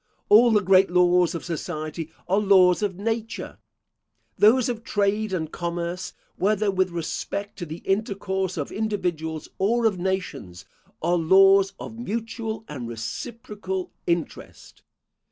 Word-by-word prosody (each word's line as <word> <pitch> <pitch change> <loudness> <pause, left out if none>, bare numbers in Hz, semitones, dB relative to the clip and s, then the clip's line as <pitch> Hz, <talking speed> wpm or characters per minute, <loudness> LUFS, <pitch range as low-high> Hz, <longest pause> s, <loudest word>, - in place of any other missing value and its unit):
All 230 +4 +7
the 210 -3 +3
great 190 +1 +5
laws 180 0 +3
of 165 - -5
society 160 -1 -5 0.2
are 195 +3 +2
laws 190 -3 +5
of 200 -3 -1
nature. 225 +3 -4 0.8
Those 235 +4 +5
of 235 -2 -4
trade 205 0 0
and 160 -4 -3
commerce, 175 +1 -4 0.2
whether 210 +1 +1
with 185 -1 +1
respect 175 +4 -4
to 175 - -5
the 160 +3 -8
intercourse 190 -3 -1
of 145 - -3
individuals 175 -8 -3
or 230 +4 +2
of 200 -5 +2
nations, 180 - -4 0.4
are 175 +2 +2
laws 195 +3 +5
of 225 - -8
mutual 225 -1 -4
and 130 -5 -6
reciprocal 190 - -5 0.2
interest. 170 -2 -4
190 Hz, 130 wpm, -24 LUFS, 175-210 Hz, 0.8 s, All